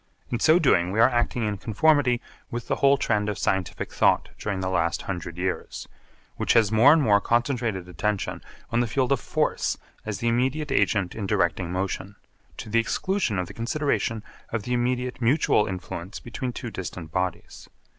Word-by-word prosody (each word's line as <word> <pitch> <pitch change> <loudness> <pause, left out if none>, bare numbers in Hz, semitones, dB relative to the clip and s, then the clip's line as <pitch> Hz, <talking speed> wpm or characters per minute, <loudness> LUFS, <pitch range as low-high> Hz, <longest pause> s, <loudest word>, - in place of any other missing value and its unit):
In 120 - -1
so 155 +6 +5
doing 95 - +3
we 105 - -1
are 115 - +8
acting 120 0 0
in 105 -1 -1
conformity 125 +2 +2 0.3
with 120 0 -5
the - - 0
whole 140 0 +4
trend 105 -5 0
of 105 - -3
scientific 95 -2 -2
thought - - +3
during 100 -2 -2
the 95 - -2
last 85 -2 0
hundred 85 -2 -5
years, 90 +1 -3 0.5
which - - +2
has 110 -3 +4
more 115 +6 +7
and 160 -1 +5
more 105 -3 +4
concentrated 115 -5 0
attention 100 +4 -2 0.3
on 120 - +2
the 120 - +1
field 130 +3 0
of 135 - +3
force - - -1 0.3
as 110 -2 -4
the 120 - -2
immediate 130 +5 0
agent 100 -8 +1
in 105 -3 -4
directing 85 -3 0
motion, 95 +2 -3 0.4
to - - -7
the 115 +2 +2
exclusion 175 - 0
of 90 - -1
the - - -11
consideration 115 -3 -1 0.3
of 115 -3 -3
the 125 - -2
immediate 125 +1 -1
mutual 120 -3 +3
influence 90 0 -6
between 125 +2 -5
two 120 -1 -6
distant 85 -4 -6
bodies. 90 0 -4
110 Hz, 180 wpm, -25 LUFS, 95-125 Hz, 0.5 s, are